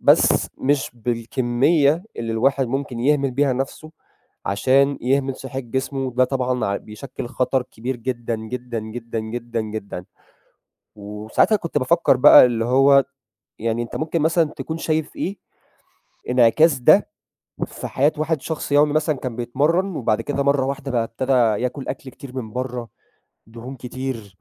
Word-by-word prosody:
بس - - +4
مش 140 0 +1
بالكمية 125 - +1
اللي 115 -1 -3
الواحد 135 +4 +2
ممكن 130 -1 -3
يهمل 140 +1 +2
بيها 135 +1 +1
نفسه 135 +4 -4 0.6
عشان 135 +7 +2
يهمل 135 +1 0
صحة 135 0 -6
جسمه، 130 +2 -3
ده 130 +1 +3
طبعًا 125 -1 -1
ع 100 0 0
بيشكل 120 +5 -8
خطر 125 +1 0
كبير 125 +1 -5
جدًا، 120 -1 -3
جدًا، 120 +2 -5
جدًا، 115 +1 -6
جدًا، 115 +1 -4
جدًا. 105 -4 -6 0.9
وساعتها 105 - 0
كنت 170 -7 -3
بافكر 145 0 +3
بقى 130 0 +9
اللي 115 -2 0
هو 135 +2 +5 0.6
يعني 115 +1 -1
أنت 120 - -6
ممكن 160 0 -1
مثلًا 165 +2 +3
تكون 160 0 -5
شايف 160 -1 -2
إيه، 195 +3 -3 0.9
انعكاس 130 +5 +4
ده 120 - +5 0.6
في - - -7
حياة 145 +4 +2
واحد 155 -1 0
شخص 160 -2 -4
يومي 145 +1 +4
مثلًا 155 0 +1
كان 125 -3 -5
بيتمرن 150 +10 0
وبعد 110 -3 0
كده 140 +3 -1
مرّة 140 -1 +2
واحدة 135 0 -4
بقى 120 -2 +1
ابتدا 120 -2 +1
ياكل 125 +3 -4
أكل 130 - -5
كتير 130 +1 -11
من 110 -4 -5
برّه، 125 -2 -4 0.6
دهون 120 +4 -9
كتير، 125 -5 -6
130 Hz, 150 wpm, -21 LUFS, 115-140 Hz, 0.9 s, بقى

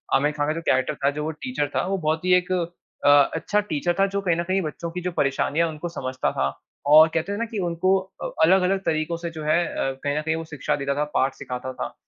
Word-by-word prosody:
आमिर 145 +2 +3
खान 145 0 -2
का 155 - +1
जो 165 - -4
कैरेक्टर 130 0 +2
था, 140 - +1
जो 150 +1 -4
वो 160 - -2
टीचर 160 - -3
था, - - +1
वो 195 0 0
बहुत 160 +3 0
ही 180 - +4
एक 180 +1 -3 0.5
अ, - - +7 0.3
अच्छा 205 +5 0
टीचर 175 -3 -1
था 195 - +5
जो 200 - +1
कहीं 175 -4 +1
न 170 - 0
कहीं 190 +2 0
बच्चों 165 +1 -5
की 180 +1 -5
जो 180 +1 -2
परेशानियाँ 145 +3 +1
उनको 160 +2 -5
समझता 130 -5 -2
था 70 0 0 0.4
और 155 +2 +9
कहते 165 +5 -1
थे - - -3
ना 230 - -1
कि 220 -2 -5
उनको 185 +3 +2
अ, 190 0 -8
अलग-अलग 190 +2 +4
तरीकों 160 +1 0
से 170 0 -5
जो 155 -2 -7
है 155 +3 +3
अ, 135 - -2
कहीं 145 +1 0
न - - 0
कहीं 160 +1 -1
वो 165 - -4
शिक्षा 150 -4 -2
देता 140 -1 -2
था, 150 - +1
पाठ 135 +1 +2
सिखाता 125 +1 -6
था। - - -5
160 Hz, 260 wpm, -24 LUFS, 145-180 Hz, 0.5 s, और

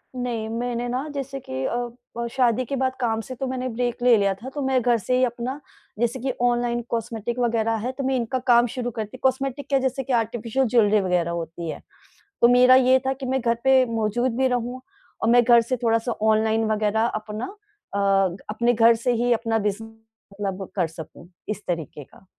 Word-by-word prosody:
नहीं 240 -3 -3
मैंने 240 +1 -2
ना 255 +5 -2
जैसे 275 0 -4
कि 130 0 -3
अ, 240 0 -4
शादी 255 -1 +2
के 275 - -3
बाद 260 0 0
काम 225 -2 0
से 255 +2 -8
तो 265 +1 -3
मैंने 255 0 -3
ब्रेक 240 +1 -2
ले 245 -2 +6
लिया 200 -1 +2
था। 235 +7 -9
तो 285 +1 -5
मैं 260 -1 +2
घर 240 0 +3
से 250 +5 -1
ही 255 - +3
अपना 245 +4 -4 0.4
जैसे 240 +2 0
कि 260 +2 -1
ऑनलाइन 240 0 +1
कॉस्मेटिक 230 +1 -3
वग़ैरह 225 -1 +1
है 255 - -1
तो 275 - -3
मैं 265 0 +1
इनका 255 +1 -1
काम 240 0 +5
शुरू 245 +1 -4
करती 220 +2 -6
हूँ। - - -32
कॉस्मेटिक 270 +1 0
क्या 275 -1 +3
जैसे 265 0 -1
कि 265 - -3
आर्टिफ़िशियल 235 +2 0
ज्वेलरी 215 -2 +4
वग़ैरह 180 -2 0
होती 170 0 -5
है। - - -6 0.6
तो 235 - +7
मेरा 250 +1 +6
ये 260 0 +5
था 265 - +2
कि 265 0 -6
मैं 265 +1 0
घर 235 -1 +1
पे 265 -1 +5
मौजूद 230 +3 0
भी 265 0 +2
रहूँ 245 +1 -2 0.4
और 225 - +2
मैं 245 0 +6
घर 235 -1 +6
से 255 +2 -2
थोड़ा 230 -1 +3
सा 235 +1 -3
ऑनलाइन 220 +1 +2
वग़ैरह 215 +1 +1 0.2
अपना 215 +2 -5 0.5
अ, - - 0 0.5
अपने 235 +3 +1
घर 230 +1 +6
से 245 +2 0
ही 240 +1 +1
अपना 225 -1 +1
बिज़ 210 +1 -2
मतलब 210 -4 -8
कर 175 -3 +2
सकूँ 165 +1 -11 0.2
इस 210 -1 -4
तरीके 160 -4 -4
का। - - -21
235 Hz, 210 wpm, -24 LUFS, 220-255 Hz, 0.6 s, तो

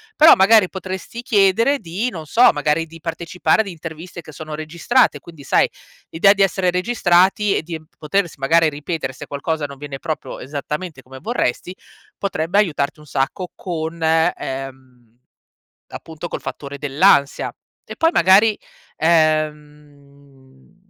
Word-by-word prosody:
Però, 310 +2 +8
magari 195 0 +5
potresti 190 +4 -6
chiedere 230 +4 +3
di 195 +5 -3
non 165 -8 -8
so, 235 +11 +5
magari 150 +2 0
di 165 +1 -14
partecipare 170 +5 0
ad 215 - -6
interviste 170 0 -8
che 155 - -13
sono 155 +1 -8
registrate, 170 +11 +1
quindi 165 -4 -14
sai, - - +3 0.4
l'idea 195 +5 +5
di 200 -1 +2
essere 190 -1 +1
registrati 190 0 +2
e - - -3
di 160 -1 -6 0.2
potersi 170 +3 -1
magari 160 +4 +3
ripetere 150 -1 -4
se - - -10
qualcosa 150 +2 -3
non 140 -1 -9
viene 140 -1 -7
proprio 155 - -5
esattamente 150 +3 -6
come 130 +1 -12
vorresti, 185 - -2 0.4
potrebbe 180 -2 -2
aiutarti 150 -6 0
un 150 - -15
sacco 145 +7 -2
con 165 -2 -5
ehm, 135 -7 -2 0.7
appunto 160 +1 -8
col - - -6
fattore 140 0 -7
dell'ansia. 145 0 +2 0.4
E - - -6
poi, 325 - +3
magari, 200 +5 +5 0.4
ehm, 150 -3 -2
160 Hz, 140 wpm, -20 LUFS, 145-185 Hz, 0.7 s, Però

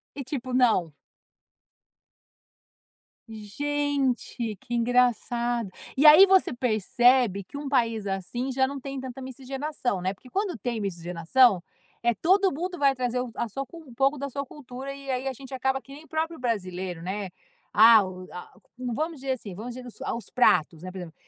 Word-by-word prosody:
E 275 - -5
tipo, 255 -1 -5
não 220 - +3 2.4
Gente, 260 0 -2
que 240 +4 -9
engraçado. 240 -1 +1 0.3
E 285 - +3
aí 310 +6 +11
você 380 -7 +4
percebe 240 -2 +2
que 235 - -10
um 285 0 -5
país 230 -6 +1
assim, 240 +7 -3
já 265 0 +3
não 275 +1 -5
tem 270 0 -6
tanta 260 0 -7
miscigenação, 265 -4 -3
né. 185 +1 -1
Porque 250 +6 -17
quando 390 - -2
tem 230 +1 -3
miscigenação, 180 +4 +2 0.4
eh, 235 0 +2
todo 380 - +3
mundo 355 +5 -4
vai 275 -1 +4
trazer 250 -1 -1
o 250 -1 -3
a 235 - -2
sua 275 +6 -4
cu 335 +6 -12
um 255 - -13
pouco 275 +4 +2
da 280 +1 -4
sua 280 +2 -4
cultura, 265 0 -8
e 275 -1 -6
aí 255 +1 -2
a 265 - -1
gente 265 +1 -11
acaba 265 +1 0
que 275 - -14
nem 305 +3 -12
próprio 325 +1 -2
brasileiro, 185 -7 -3
né. 195 +3 -3 0.5
Ah, 225 0 +8
o 185 0 -9
a 180 - -9 0.3
vamos 270 +6 -3
dizer 265 0 -1
assim, 220 -6 -7
vamos 230 +6 -7
dizer 255 0 -9 0.2
a - - -1
os 235 - -8
pratos, 165 -9 +3
né, 185 - -5
por 185 - -9
exemplo: 175 -3 -8
250 Hz, 175 wpm, -26 LUFS, 215-275 Hz, 2.4 s, aí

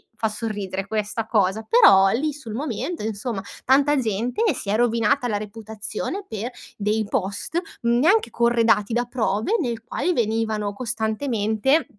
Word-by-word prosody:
fa 225 -1 -1
sorridere 205 -3 -4
questa 215 +1 -2
cosa, 205 -1 +2
però 195 - +7
lì 290 +9 0
sul 265 -7 -8
momento, 280 +4 -3
insomma 215 0 -3 0.2
tanta 280 +3 +4
gente 235 - -1 0.2
si 200 - -5
è - - +2
rovinata 235 +2 +2
la 210 -3 0
reputazione 215 - -5
per 220 +2 -4 0.3
dei 215 +1 0
post, 205 - -2 0.2
neanche 245 - +3
corredati 230 -2 +2
da 240 +1 +2
prove, 225 - 0
nel 235 -5 -3
quale 355 +9 -1
venivano 220 -4 -1
costantemente, 225 +3 0
225 Hz, 135 wpm, -23 LUFS, 210-245 Hz, 0.3 s, però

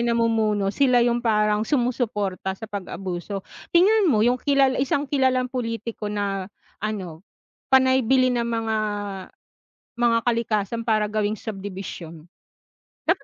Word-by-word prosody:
'yong 235 - 0
namumuno, 215 -4 +1
sila 250 -1 +4
'yong 240 0 +1
parang 210 -2 +1
sumusuporta 215 -8 -1
sa 220 - -8
pag-abuso. 195 -1 -5 0.3
Tingnan 405 +2 +5
mo 220 -7 +3
'yong 245 +1 +2
kilal 275 -2 +3
isang 280 +2 0
kilalang 260 -2 +1
pulitiko 230 -3 -4
na 200 -2 -2 0.3
ano, 190 -7 -4 0.5
panay 260 0 +5
bili 255 +1 +3
ng 235 -1 0
mga, 225 -1 -1 1.2
mga 235 -1 +3
kalikasan 230 -1 0
para 215 -2 +1
gawing 210 0 -1
subdivision. 190 -6 -7 0.8
Dapat - - +2
225 Hz, 120 wpm, -24 LUFS, 205-250 Hz, 1.2 s, Tingnan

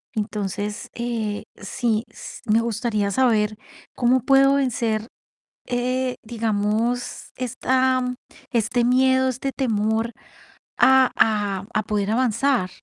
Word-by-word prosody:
Entonces, 210 -1 -3
eh, 230 -3 -3
sí, 220 +2 -1
s - - -10
me 220 +2 +3
gustaría 220 -3 -1
saber, 215 -3 +2 0.4
¿cómo 250 +1 +3
puedo 275 +2 +5
vencer, 230 -5 0 0.6
eh, 250 +1 -1
digamos, 225 +2 -1
esta 255 +1 +1 0.5
este 235 +1 +1
miedo, 260 +1 +3
este 260 +2 -3
temor 225 -2 0 0.7
a 265 -1 +6
a 205 -3 +1
a 215 - +1
poder 210 0 -1
avanzar? 250 -3 +1
230 Hz, 105 wpm, -23 LUFS, 215-255 Hz, 0.7 s, a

